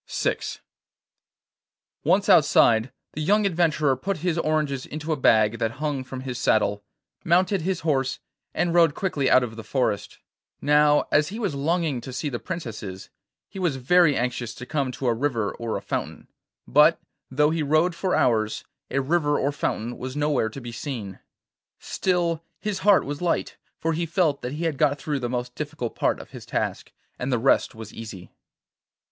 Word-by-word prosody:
VI - - 0 1.7
Once 200 +2 +3
outside, 135 - +5 0.2
the 155 - -4
young 205 +6 +3
adventurer 155 -6 +2
put 195 +9 -3
his 175 -3 +1
oranges 150 -4 -1
into 155 +1 -5
a - - +2
bag 110 -4 +3
that 115 0 -1
hung 145 -1 -2
from 130 0 -7
his 130 -2 -5
saddle, 105 -3 +1 0.4
mounted 185 +2 +2
his 185 +2 -2
horse, 135 -5 0 0.3
and 175 -1 0
rode 165 -3 +4
quickly 150 -9 0
out 130 0 +6
of 115 -2 -5
the 115 - -8
forest. 115 -6 -1 0.4
Now, 150 0 +4
as 150 0 +4
he 210 - -6
was 205 -9 -1
longing 150 -2 0
to 130 - -8
see 130 +4 -3
the 120 -3 -4
princesses, 110 - -6 0.4
he 195 - -9
was 175 -7 0
very 150 +4 +4
anxious 120 -2 -2
to 125 - -8
come 140 -1 -1
to 135 - -6
a 120 - +3
river 115 -4 -1
or 115 -2 -3
a - - -8
fountain, - - -4 0.4
but, 150 +5 +5 0.3
though 150 +3 +2
he 165 0 -1
rode 155 +4 +2
for 185 +2 -1
hours, 110 -3 +1 0.3
a 135 - 0
river 145 +1 +1
or 140 - 0
fountain 120 -4 -3
was 130 +1 -5
nowhere 145 -6 +1
to 125 - -8
be 120 -1 -7
seen. 115 -6 -6 0.6
Still 170 -3 -1 0.2
his 210 -3 -3
heart 200 0 +4
was 145 +2 -5
light, 175 -1 -1 0.2
for 165 0 -1
he 170 +1 -2
felt 160 -4 +1
that 125 - -4
he 155 +3 -4
had 160 -5 -1
got 145 -1 +3
through 145 0 -3
the 120 -2 -3
most 125 0 -3
difficult 150 -5 -5
part - - 0
of - - -12
his - - -9
task, - - -3 0.3
and 125 +2 -2
the 125 - +2
rest 125 0 +2
was 110 -1 -9
easy. 105 -5 -9
145 Hz, 180 wpm, -25 LUFS, 125-165 Hz, 1.7 s, out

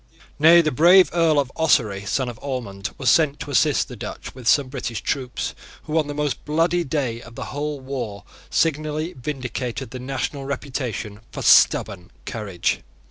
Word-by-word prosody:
Nay, 165 +3 +8
the 155 - +1
brave 175 +8 +6
Earl 165 -3 +3
of 135 -3 +1
Ossory, 110 -11 +2
son 130 -2 0
of 120 -3 -7
Ormond, 110 -8 -4
was 135 - +3
sent 150 -3 +3
to 145 - -5
assist 145 0 +3
the - - -9
Dutch - - -7
with 125 -3 -9
some 145 +1 +5
British 125 -4 -4
troops, 130 -3 -3 0.3
who, 155 - -4
on 150 - -1
the 145 - -5
most 150 -2 -2
bloody 165 +3 +1
day 130 -6 -2
of 115 0 -13
the - - -5
whole 145 0 -3
war, 130 -7 -5 0.3
signally 155 +1 0
vindicated 125 -3 -5
the 130 - -6
national 135 +2 -3
reputation 125 -7 -4
for - - -6
stubborn 90 -3 +4 0.2
courage. 105 -7 -2
135 Hz, 170 wpm, -22 LUFS, 120-150 Hz, 0.3 s, Nay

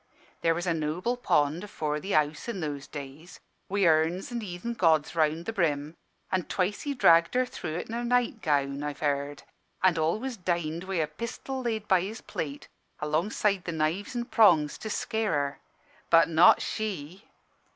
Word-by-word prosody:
There 165 0 +2
was 175 +2 -3
a 175 - +1
noble 165 +9 -1
pond 155 -8 +1
afore 150 -7 -3
the 195 +6 -4
house, 150 +7 +1
i' - - -1
those 150 -6 -4
days, 145 +4 -9 0.3
wi' 200 0 +2
urns 165 +5 +2
an' 240 -1 -3
heathen 195 +3 -5
gods 160 -6 +2
around 160 +1 +1
the 225 - -3
brim, 155 -6 0 0.4
an' 185 -2 0
twice 195 +2 -1
he 285 -1 -3
dragged 170 -5 +5
her 255 0 +3
through 160 -10 -6
it 175 - -4
in 225 - -7
her 240 +1 -2
night 240 -2 +1
gown, 140 -2 0
I've 145 -1 -5
heerd, 145 -1 -1 0.4
an' 180 -3 +4
always 220 +11 -1
dined 170 -2 -2
wi' 190 0 -3
a 160 -3 +2
pistol 245 - -6
laid 220 -4 -2
by 190 -3 +4
his 205 +5 -5
plate, 145 -2 -5 0.3
alongside 180 +5 0
the 170 - -2
knives 160 +8 -1
an' 240 0 -2
prongs, 175 -12 +4
to 220 - -5
scare 220 -2 -1
her. 140 -1 -1 0.5
But 165 0 +6
not 170 +2 +6
she! 190 -3 -4
170 Hz, 180 wpm, -28 LUFS, 155-210 Hz, 0.5 s, But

